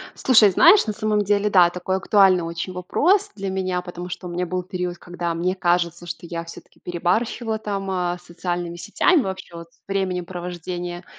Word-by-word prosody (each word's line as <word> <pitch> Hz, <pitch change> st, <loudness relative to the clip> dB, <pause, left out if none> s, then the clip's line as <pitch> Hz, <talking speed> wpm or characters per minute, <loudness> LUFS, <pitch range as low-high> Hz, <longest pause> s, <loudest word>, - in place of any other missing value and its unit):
Слушай, 225 Hz, -5 st, +5 dB
знаешь, 340 Hz, -, +6 dB
на 215 Hz, -, -1 dB
самом 215 Hz, -1 st, 0 dB
деле, 205 Hz, +1 st, +1 dB
да, 180 Hz, -3 st, +6 dB
такой 180 Hz, +1 st, -2 dB
актуальный 190 Hz, -2 st, +4 dB
очень 170 Hz, +2 st, -5 dB
вопрос 360 Hz, -, +1 dB
для 195 Hz, -1 st, -4 dB
меня, 185 Hz, -1 st, -1 dB
потому 180 Hz, 0 st, -8 dB
что 180 Hz, +1 st, -7 dB
у -, -, -5 dB
меня 175 Hz, +1 st, -2 dB
был 185 Hz, +1 st, -2 dB
период, 180 Hz, -1 st, -4 dB
когда, 175 Hz, -1 st, -4 dB
мне 180 Hz, +2 st, -1 dB
кажется, 175 Hz, -1 st, 0 dB
что 170 Hz, 0 st, -7 dB
я 170 Hz, 0 st, -5 dB
всё-таки 170 Hz, -, -13 dB
перебарщивала 220 Hz, +6 st, -1 dB
там, 200 Hz, -2 st, -4 dB
а, 180 Hz, -1 st, -1 dB
с 175 Hz, -, -22 dB
социальными 175 Hz, 0 st, -4 dB
сетями, 280 Hz, -, +2 dB
вообще 190 Hz, -4 st, -6 dB
вот 170 Hz, 0 st, -9 dB
с -, -, -31 dB
временем 190 Hz, -2 st, -1 dB
провождения 175 Hz, 0 st, -6 dB
180 Hz, 190 wpm, -22 LUFS, 175-195 Hz, -, знаешь